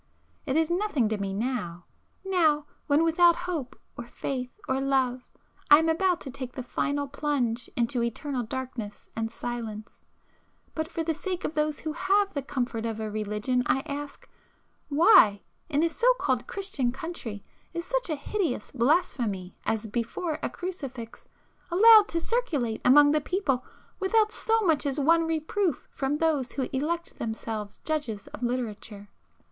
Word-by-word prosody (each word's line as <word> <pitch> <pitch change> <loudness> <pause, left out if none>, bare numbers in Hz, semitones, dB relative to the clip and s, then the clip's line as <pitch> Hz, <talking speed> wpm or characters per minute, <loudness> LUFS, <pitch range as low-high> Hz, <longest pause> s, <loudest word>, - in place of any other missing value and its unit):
It 265 - 0
is 320 +1 +2
nothing 345 - +1
to 215 -1 -2
me 195 -1 -2
now,—now, 260 - -1 0.2
when 290 +2 +4
without 340 +1 +5
hope, 315 -9 -4 0.2
or 240 - -7
faith 255 +1 -4 0.2
or 260 +1 0
love, 260 -2 +1 0.5
I 295 - +10
am 320 +1 +2
about 355 +2 +2
to 270 - -7
take 255 -1 -7
the 255 - -5
final 285 +3 -1
plunge 270 -5 -1
into 240 +1 0
eternal 250 +3 -2
darkness 235 -3 -6
and 225 0 -2
silence,—but 235 +7 -8
for 330 -1 -3
the 325 0 0
sake 365 +3 -4
of - - -2
those 305 -1 -1
who 310 -1 -3
have 395 +4 +2
the 280 - -2
comfort 245 -4 -3
of 220 -1 -4
a 215 -1 -3
religion 215 +4 -1
I 265 +2 +2
ask, 290 0 -7 0.6
why, 290 - +6 0.3
in 295 0 +2
a - - +4
so 475 +9 +3
called 255 - -1
Christian 380 -11 -2
country, 255 - -6 0.3
is 340 0 -4
such - - -1
a 310 - 0
hideous 315 - -2
blasphemy 235 - 0
as 225 0 0
'Before 240 - -3
a - - -1
Crucifix' 275 -11 -7 0.4
allowed 425 +4 +8
to 335 - -1
circulate 320 - -1
among 290 +3 +7
the 305 0 +2
people 285 -7 0 0.4
without 425 +2 +3
so 450 0 +1
much 320 -7 +2
as 280 +1 -1
one 330 +3 +4
reproof 325 +3 -1
from 275 +2 -1
those 300 -6 0
who 265 -2 -2
elect 335 +6 -2
themselves 220 -2 -4
judges 290 -10 -2
of - - -10
literature? 225 -4 -3
280 Hz, 155 wpm, -27 LUFS, 240-330 Hz, 0.6 s, I